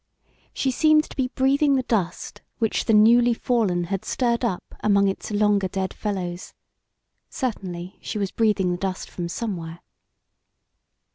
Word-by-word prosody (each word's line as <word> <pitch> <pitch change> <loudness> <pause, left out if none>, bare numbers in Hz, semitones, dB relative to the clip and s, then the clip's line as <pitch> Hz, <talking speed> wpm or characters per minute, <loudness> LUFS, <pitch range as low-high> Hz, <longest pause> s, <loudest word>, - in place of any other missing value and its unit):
She 265 - -1
seemed 310 +3 +4
to - - -10
be 265 -2 0
breathing 275 +2 +2
the 260 - +1
dust 195 -8 -2 0.2
which 225 -2 0
the 225 - +2
newly 235 +3 +5
fallen 215 -9 0
had 195 +2 -3
stirred 240 -1 0
up 190 -7 -3
among 200 -1 +3
its 195 - -3
longer 205 -2 +2
dead 190 0 -3
fellows. 185 -4 -4 0.7
Certainly 185 - -5
she - - -5
was 200 -2 -2
breathing 210 -5 +1
the 175 - -1
dust 190 -1 -4
from 170 -1 -4
somewhere. 170 -6 -5
210 Hz, 145 wpm, -24 LUFS, 185-240 Hz, 0.7 s, newly